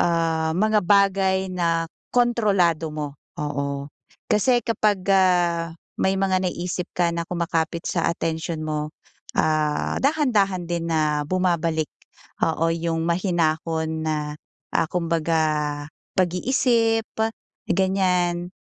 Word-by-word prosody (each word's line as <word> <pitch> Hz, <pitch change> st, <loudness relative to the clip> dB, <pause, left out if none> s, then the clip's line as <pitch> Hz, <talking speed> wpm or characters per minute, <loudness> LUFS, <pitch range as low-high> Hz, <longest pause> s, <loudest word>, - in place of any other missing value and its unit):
ah, 165 Hz, -1 st, +1 dB
mga 215 Hz, +1 st, +3 dB
bagay 190 Hz, -1 st, +2 dB
na 165 Hz, -2 st, +1 dB, 0.2 s
kontrolado 200 Hz, -10 st, +2 dB
mo, 150 Hz, -2 st, -4 dB, 0.2 s
oo. 140 Hz, -1 st, -3 dB, 0.4 s
Kasi 240 Hz, +2 st, +3 dB
kapag, 210 Hz, -4 st, +1 dB
ah, 175 Hz, -3 st, +2 dB, 0.2 s
may 190 Hz, 0 st, +2 dB
mga 190 Hz, -1 st, +1 dB
naiisip 175 Hz, 0 st, -4 dB
ka 170 Hz, -1 st, +2 dB
na 170 Hz, 0 st, -3 dB
kumapit 170 Hz, -1 st, -1 dB
sa -, -, 0 dB
atensyon 160 Hz, -1 st, -2 dB
mo, 150 Hz, -1 st, -2 dB, 0.5 s
ah, 155 Hz, -1 st, +1 dB
dahan-dahan 220 Hz, -, +2 dB
din 170 Hz, 0 st, -3 dB
na 155 Hz, -2 st, +1 dB
bumabalik, 170 Hz, -4 st, +1 dB, 0.6 s
oo, 165 Hz, +1 st, +1 dB
yung 165 Hz, -1 st, -1 dB
mahinahon 165 Hz, -2 st, 0 dB
na, 155 Hz, -1 st, 0 dB, 0.6 s
ah, 165 Hz, -1 st, +1 dB
kumbaga 165 Hz, -1 st, 0 dB, 0.8 s
pag-iisip, 225 Hz, +4 st, +2 dB, 0.6 s
ganyan. 180 Hz, -2 st, +1 dB
170 Hz, 105 wpm, -23 LUFS, 160-190 Hz, 0.8 s, mga